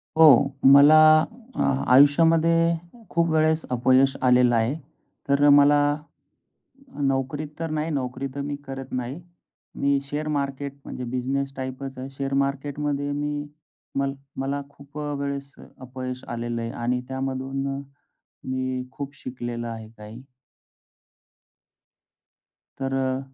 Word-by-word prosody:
हो 160 Hz, 0 st, +7 dB, 0.5 s
मला 145 Hz, +3 st, +8 dB, 0.6 s
अ, -, -, -1 dB, 0.3 s
आयुष्यामध्ये 165 Hz, +4 st, +5 dB, 0.4 s
खूप 170 Hz, 0 st, +1 dB
वेळेस 160 Hz, 0 st, +2 dB
अपयश 130 Hz, +2 st, +3 dB
आलेलं 125 Hz, -1 st, +4 dB
आहे. 115 Hz, +3 st, +1 dB, 0.6 s
तर 140 Hz, +1 st, +4 dB
मला 145 Hz, +1 st, +6 dB, 1.3 s
नोकरीत 135 Hz, +3 st, -2 dB
तर 165 Hz, -1 st, -3 dB
नाही, 155 Hz, +1 st, -2 dB
नोकरी 130 Hz, -2 st, -3 dB
तर 140 Hz, -, -4 dB
मी 145 Hz, 0 st, -3 dB
करत 135 Hz, 0 st, -7 dB
नाही. 130 Hz, +5 st, -4 dB, 0.6 s
मी 140 Hz, 0 st, +2 dB
शेअर 150 Hz, +2 st, -4 dB
मार्केट 140 Hz, -1 st, -2 dB
म्हणजे 125 Hz, -, -6 dB
बिझनेस 135 Hz, +2 st, -2 dB
टाईपच 130 Hz, 0 st, -6 dB
आहे. 130 Hz, +1 st, -6 dB
शेअर 135 Hz, 0 st, -4 dB
मार्केट 140 Hz, +1 st, -4 dB
मध्ये 145 Hz, -1 st, -1 dB
मी 145 Hz, 0 st, -3 dB, 0.5 s
मल 140 Hz, 0 st, 0 dB, 0.3 s
मला 140 Hz, +1 st, -2 dB
खूप 140 Hz, +1 st, -13 dB
अ, 150 Hz, -1 st, -3 dB
वेळेस 140 Hz, -1 st, -4 dB, 0.3 s
अपयश 130 Hz, 0 st, -7 dB
आलेलं 120 Hz, 0 st, -3 dB
आहे 115 Hz, -, -4 dB
आणि 125 Hz, +1 st, -2 dB
त्यामधून 135 Hz, +1 st, -3 dB
मग 135 Hz, 0 st, -3 dB, 0.7 s
मी 130 Hz, 0 st, -2 dB
खूप 140 Hz, 0 st, -7 dB
शिकलेलं 120 Hz, -2 st, -5 dB
आहे 110 Hz, -1 st, -7 dB
काही. 105 Hz, +3 st, -10 dB, 2.6 s
तर 135 Hz, 0 st, -2 dB
अ, 130 Hz, -1 st, 0 dB
135 Hz, 125 wpm, -24 LUFS, 130-145 Hz, 2.6 s, मला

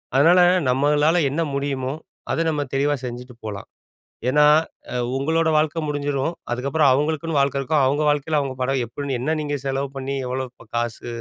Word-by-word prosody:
அதனால, 165 Hz, +7 st, +6 dB, 0.3 s
நம்மளால 150 Hz, +5 st, +3 dB
என்ன 150 Hz, +5 st, -1 dB
முடியுமோ! 135 Hz, -2 st, -2 dB, 0.4 s
அத 165 Hz, -, +1 dB
நம்ம 150 Hz, -2 st, -1 dB
தெளிவா 145 Hz, +2 st, +2 dB
செஞ்சுட்டு 125 Hz, 0 st, -7 dB
போலாம். 105 Hz, -2 st, -6 dB, 0.6 s
ஏன்னா, 150 Hz, +3 st, +4 dB, 0.5 s
அ -, -, -2 dB, 0.2 s
உங்களோட 160 Hz, +4 st, +1 dB
வாழ்க்கை 155 Hz, +1 st, +1 dB
முடிஞ்சிரும். 145 Hz, +2 st, -1 dB, 0.2 s
அதுக்கப்புறம் 140 Hz, +4 st, +2 dB
அவுங்களுக்குன்னு 155 Hz, +3 st, 0 dB
வாழ்க்கை 140 Hz, 0 st, +1 dB
இருக்கும், 150 Hz, +1 st, +1 dB
அவுங்க 145 Hz, +3 st, +1 dB
வாழ்க்கையில 150 Hz, +1 st, 0 dB
அவுங்க 135 Hz, -2 st, -3 dB
படம் 130 Hz, 0 st, 0 dB
எப்படின்னு 135 Hz, +2 st, -4 dB
என்ன 155 Hz, +5 st, 0 dB
நீங்க 145 Hz, -1 st, -2 dB
செலவு 135 Hz, 0 st, -1 dB
பண்ணி, 135 Hz, +1 st, -3 dB
எவ்வளோ 130 Hz, +1 st, -2 dB, 0.3 s
காசு 120 Hz, 0 st, -3 dB
140 Hz, 155 wpm, -22 LUFS, 130-150 Hz, 0.6 s, அதனால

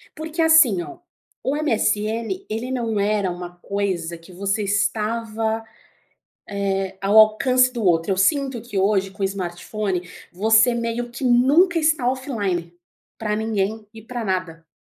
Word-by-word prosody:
Porque 315 Hz, +1 st, -4 dB
assim 320 Hz, -, +5 dB
ó, 340 Hz, -, -9 dB, 0.4 s
o 270 Hz, -, 0 dB
MSN, 230 Hz, -, -1 dB
ele 225 Hz, +4 st, -4 dB
não 230 Hz, -4 st, -1 dB
era 200 Hz, -2 st, +1 dB
uma 175 Hz, 0 st, -8 dB
coisa 180 Hz, -3 st, -3 dB
que 165 Hz, +3 st, -16 dB
você 200 Hz, +3 st, -1 dB
estava, 220 Hz, +2 st, -1 dB, 1.2 s
eh, 195 Hz, 0 st, -4 dB
ao 200 Hz, +2 st, +4 dB
alcance 250 Hz, +4 st, +5 dB
do 235 Hz, -3 st, -4 dB
outro. 165 Hz, -1 st, +2 dB
Eu -, -, -1 dB
sinto 270 Hz, -, +1 dB
que 225 Hz, -3 st, -5 dB
hoje, 195 Hz, 0 st, +1 dB
com 195 Hz, -, -9 dB
o -, -, +3 dB
smartphone, 185 Hz, 0 st, -4 dB, 0.2 s
você 220 Hz, +5 st, +4 dB
meio 235 Hz, +1 st, -3 dB
que 245 Hz, +3 st, -6 dB
nunca 280 Hz, +9 st, +4 dB
está 305 Hz, -5 st, +2 dB
offline, 205 Hz, -, -2 dB, 0.4 s
pra 210 Hz, -1 st, -1 dB
ninguém 215 Hz, 0 st, -2 dB
e 220 Hz, -, -11 dB
pra 235 Hz, +1 st, -5 dB
nada, 180 Hz, -4 st, -3 dB
215 Hz, 145 wpm, -22 LUFS, 195-245 Hz, 1.2 s, assim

